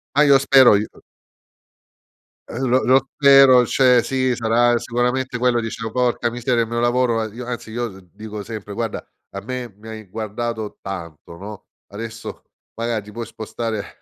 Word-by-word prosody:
Ma 150 Hz, -, +5 dB
io 140 Hz, -2 st, +6 dB
spero, 135 Hz, -4 st, +6 dB
io 105 Hz, +2 st, -1 dB, 1.6 s
Eh, 115 Hz, -, -8 dB
lo 130 Hz, 0 st, +1 dB
lo 135 Hz, +1 st, +3 dB
spero, 135 Hz, -3 st, +7 dB
cioè 125 Hz, -2 st, +4 dB
sì, 130 Hz, 0 st, 0 dB
sarà 120 Hz, +1 st, +2 dB
sicuramente 125 Hz, +1 st, -1 dB
quello. 120 Hz, -1 st, +2 dB
Dicevo: 115 Hz, 0 st, -5 dB
"Porca 120 Hz, -1 st, 0 dB
miseria, 120 Hz, -1 st, 0 dB
il -, -, -6 dB
mio 120 Hz, 0 st, -2 dB
lavoro", 120 Hz, 0 st, +1 dB
ma 115 Hz, -, -1 dB
io 120 Hz, +2 st, -8 dB
anzi 120 Hz, -2 st, -6 dB
io 120 Hz, +1 st, -3 dB, 0.2 s
dico 105 Hz, -1 st, -8 dB
sempre: 105 Hz, -2 st, -8 dB
"Guarda, 115 Hz, -1 st, -4 dB, 0.3 s
a 100 Hz, -, -6 dB
me 125 Hz, +1 st, -6 dB
mi 110 Hz, +1 st, -14 dB
hai 110 Hz, -2 st, -9 dB
guardato 110 Hz, +1 st, -5 dB
tanto, 85 Hz, -3 st, -8 dB
no, 105 Hz, +2 st, -10 dB, 0.2 s
adesso 110 Hz, +2 st, -8 dB, 0.3 s
magari 115 Hz, -1 st, -2 dB
ti 105 Hz, -, -13 dB
puoi 115 Hz, +2 st, -6 dB
spostare 110 Hz, -1 st, -6 dB
120 Hz, 165 wpm, -20 LUFS, 110-125 Hz, 1.6 s, spero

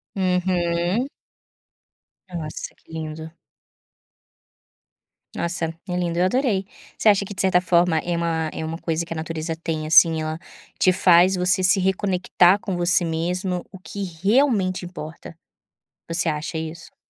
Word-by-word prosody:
Uhum. 180 Hz, +3 st, 0 dB, 1.2 s
Nossa 155 Hz, -3 st, -6 dB
que -, -, -23 dB
lindo. 160 Hz, 0 st, -6 dB, 2.1 s
Nossa 170 Hz, -1 st, -2 dB, 0.2 s
é 180 Hz, -, -2 dB
lindo, 175 Hz, -1 st, -1 dB
eu 180 Hz, -, +4 dB
adorei. 210 Hz, -2 st, +1 dB, 0.3 s
Você 220 Hz, -, +4 dB
acha 200 Hz, -1 st, +3 dB
que 200 Hz, -, -8 dB
de 185 Hz, -, -1 dB
certa 185 Hz, -2 st, +3 dB
forma 175 Hz, -2 st, +2 dB
é 175 Hz, +1 st, -2 dB
uma 165 Hz, -2 st, -1 dB
é -, -, -5 dB
uma 160 Hz, +1 st, -4 dB
coisa 165 Hz, -1 st, -2 dB
que 165 Hz, -, -6 dB
a -, -, -9 dB
natureza 160 Hz, 0 st, -4 dB
tem, 160 Hz, -2 st, -4 dB
assim, 160 Hz, 0 st, +6 dB
ela 155 Hz, 0 st, -3 dB, 0.4 s
te 185 Hz, -, +5 dB
faz 180 Hz, 0 st, +5 dB
você 180 Hz, +1 st, +2 dB
se 185 Hz, +2 st, +5 dB
reconectar 190 Hz, 0 st, +2 dB
com 185 Hz, -3 st, -4 dB
você 175 Hz, +1 st, +3 dB
mesmo 175 Hz, +2 st, -2 dB
o 190 Hz, -, -11 dB
que 200 Hz, +2 st, -6 dB, 0.2 s
realmente 200 Hz, -5 st, +2 dB
importa, 165 Hz, -1 st, -9 dB, 0.7 s
você 170 Hz, +1 st, 0 dB
acha 155 Hz, +1 st, -3 dB
isso? 160 Hz, +1 st, -7 dB
175 Hz, 145 wpm, -22 LUFS, 165-185 Hz, 2.1 s, assim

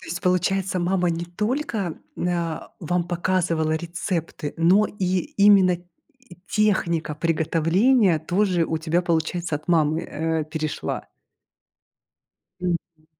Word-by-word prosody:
То -, -, -12 dB
есть, 175 Hz, +2 st, -4 dB
получается, 185 Hz, +1 st, +1 dB
мама 180 Hz, 0 st, +1 dB
не 165 Hz, +1 st, -3 dB
только, 210 Hz, -, -2 dB, 0.2 s
мн 180 Hz, -, -1 dB
а, 170 Hz, -2 st, -3 dB
вам 175 Hz, +1 st, 0 dB
показывала 170 Hz, -3 st, 0 dB
рецепты, 165 Hz, -2 st, -3 dB
но 185 Hz, +6 st, +4 dB
и 185 Hz, -2 st, -1 dB, 0.2 s
именно 200 Hz, -2 st, +6 dB, 0.5 s
и 250 Hz, -9 st, -16 dB
техника 170 Hz, -7 st, +1 dB
приготовления 165 Hz, -, +2 dB
тоже 180 Hz, +2 st, +1 dB
у 160 Hz, 0 st, -2 dB
тебя 165 Hz, +2 st, 0 dB
получается 165 Hz, -1 st, -1 dB
от 155 Hz, -, -15 dB
мамы, 160 Hz, -2 st, +3 dB
э, 160 Hz, 0 st, -2 dB
перешла? 155 Hz, -1 st, -4 dB, 1.6 s
Мгм. 170 Hz, -3 st, -4 dB
175 Hz, 120 wpm, -23 LUFS, 160-185 Hz, 1.6 s, именно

